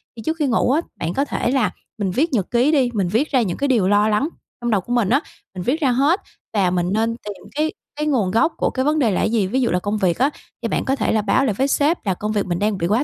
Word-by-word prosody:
thì 225 - -8
trước 320 +1 -1
khi 295 - +2
ngủ 245 0 +2
á, 305 +5 +2 0.2
bạn 165 +1 -2
có 275 - +1
thể 245 - -1
là 260 -5 +2 0.3
mình 200 -4 -1
viết 285 - 0
nhật 200 -7 0
ký 245 +5 +3
đi, 270 -5 +3
mình 195 -4 0
viết 230 - 0
ra 260 -3 +3
những 185 -6 -2
cái 280 - 0
điều 225 -8 +2
lo 205 +1 +4
lắng 220 +9 +1 0.3
trong 240 - -1
đầu 200 -3 +2
của 245 - -4
mình 235 -5 +2
á. 265 +5 +4 0.4
Mình 180 - -4
viết 275 - 0
ra 265 -3 +3
hết 285 - +2 0.3
và 195 -4 +2
mình 175 -1 0
nên 225 +1 +1
tìm 205 -3 -9
cái 310 +1 0 0.2
cái 300 0 -1
nguồn 225 -11 +1
gốc 315 +10 +2
của - - +1
cái 260 +1 -2
vấn 305 +1 +2
đề 230 -6 +3
là - - 0
gì? 220 -4 +1
Ví 260 +7 0
dụ 240 - +2
là 180 - +2
công 205 +3 -2
việc 185 -4 +1
á, 270 +3 +4 0.3
thì 230 - -1
bạn - - -1
có 270 - +1
thể - - 0
là 220 - +2
báo 210 +6 +2
lại 215 - +1
với 270 +7 0
sếp 295 0 +1
là 190 - +1
công 210 +4 -3
việc 205 -2 0
mình 175 -2 -2
đang 210 -1 0
bị 170 - -1
quá 220 +9 +2
230 Hz, 310 wpm, -21 LUFS, 200-275 Hz, 0.4 s, lo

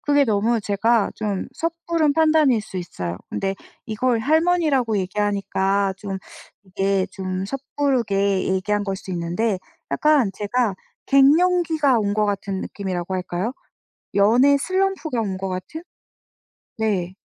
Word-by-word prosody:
그게 285 -1 +3
너무 220 +1 +1
제가 210 +2 +1
좀 205 -3 -3
섣부른 330 -2 0
판단일 310 -7 +4
수 190 -3 -6
있어요. 90 - -5
근데 195 0 -2 0.3
이걸 230 +2 0
할머니라고 305 -5 +2
얘기하니까 195 0 0
좀 195 -1 -5 0.5
이게 195 0 0
좀 185 0 -3
섣부르게 230 -6 0
얘기한 205 +2 0
걸 195 -1 -2
수 190 - -9
있는데 180 +5 -1 0.3
약간 295 -8 +3
제가 210 +1 0 0.3
갱년기가 310 -1 +4
온 205 -1 0
것 215 0 +2
같은 200 -1 -2
느낌이라고 190 -2 -4
할까요? 185 +4 -2 0.6
연애 240 +8 +5
슬럼프가 370 -5 -1
온 195 -3 -3
것 190 0 -4
같은? 185 - -6 0.9
네. 195 -5 -1
210 Hz, 270 characters per minute, -22 LUFS, 195-280 Hz, 0.9 s, 연애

